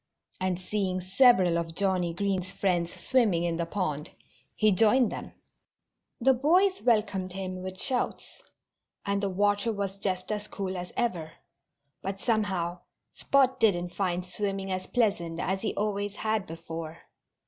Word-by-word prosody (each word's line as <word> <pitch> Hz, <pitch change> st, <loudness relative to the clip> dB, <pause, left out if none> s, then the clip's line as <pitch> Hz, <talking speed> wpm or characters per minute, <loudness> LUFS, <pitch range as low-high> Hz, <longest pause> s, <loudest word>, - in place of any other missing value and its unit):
And 185 Hz, -1 st, -1 dB
seeing 185 Hz, -1 st, -1 dB
several 185 Hz, -3 st, +4 dB
of 165 Hz, -1 st, -5 dB
Johnnie 185 Hz, -3 st, 0 dB
Green's 190 Hz, -1 st, -1 dB
friends 175 Hz, -4 st, 0 dB
swimming 215 Hz, -10 st, +2 dB
in 170 Hz, -1 st, 0 dB
the 170 Hz, -1 st, -2 dB
pond, 155 Hz, -6 st, -2 dB, 0.5 s
he 215 Hz, -1 st, +4 dB
joined 225 Hz, +5 st, +4 dB
them. -, -, -7 dB, 0.9 s
The 265 Hz, +2 st, +5 dB
boys 360 Hz, +9 st, +3 dB
welcomed 205 Hz, -6 st, +1 dB
him 185 Hz, -1 st, -5 dB
with 185 Hz, 0 st, -6 dB
shouts. 255 Hz, -2 st, -1 dB, 0.6 s
And 200 Hz, -1 st, 0 dB
the 200 Hz, -, 0 dB
water 205 Hz, +3 st, +1 dB
was 200 Hz, -2 st, -3 dB
just 185 Hz, 0 st, -2 dB
as 210 Hz, 0 st, -3 dB
cool 190 Hz, -3 st, -4 dB
as 180 Hz, 0 st, -5 dB
ever. 170 Hz, -10 st, -1 dB, 0.7 s
But 195 Hz, 0 st, -4 dB
somehow 190 Hz, -6 st, 0 dB, 0.3 s
Spot 265 Hz, -2 st, +2 dB
didn't 175 Hz, -6 st, +2 dB
find 180 Hz, -2 st, -1 dB
swimming 195 Hz, +1 st, -3 dB
as 185 Hz, 0 st, -3 dB
pleasant 185 Hz, -9 st, 0 dB
as 190 Hz, +2 st, -1 dB
he -, -, -2 dB
always 205 Hz, -1 st, -1 dB
had 215 Hz, -3 st, -1 dB
before. 165 Hz, 0 st, -7 dB
195 Hz, 145 wpm, -28 LUFS, 180-210 Hz, 0.9 s, The